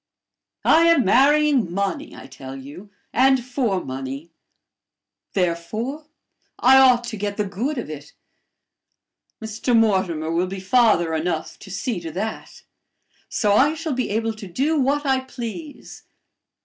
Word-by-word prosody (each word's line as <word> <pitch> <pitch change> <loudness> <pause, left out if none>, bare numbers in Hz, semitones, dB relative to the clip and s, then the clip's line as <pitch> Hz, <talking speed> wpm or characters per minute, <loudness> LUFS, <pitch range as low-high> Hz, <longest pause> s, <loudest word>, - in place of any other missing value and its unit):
I 330 +1 +5
am 335 -6 +4
marrying 275 - +4
money, 200 - -3
I - - -11
tell 135 0 -10
you 145 +10 -11 0.2
and 260 0 +3
for 245 -7 -1
money; 135 +4 -6 1.0
therefore, 215 - -2 0.5
I 265 +2 +6
ought 250 -2 +5
to 220 - -6
get 205 0 -3
the 210 - 0
good 230 +10 -3
of 240 - -4
it. 150 -1 -9 1.3
Mr. 220 +2 0
Mortimer 185 -8 +1
will 175 +2 0
be 190 +1 -6
father 190 -5 +3
enough 160 0 -3
to 195 - -12
see 195 +2 -3
to 165 -1 -7
that! 215 +5 -5 0.7
So 205 -3 +1
I 285 +9 +4
shall 320 -2 -3
be 255 -1 -2
able 225 +2 -1
to 210 -3 -8
do 285 - 0
what 285 +2 +1
I 265 -1 +2
please. 260 +4 -8
220 Hz, 140 wpm, -22 LUFS, 180-265 Hz, 1.3 s, I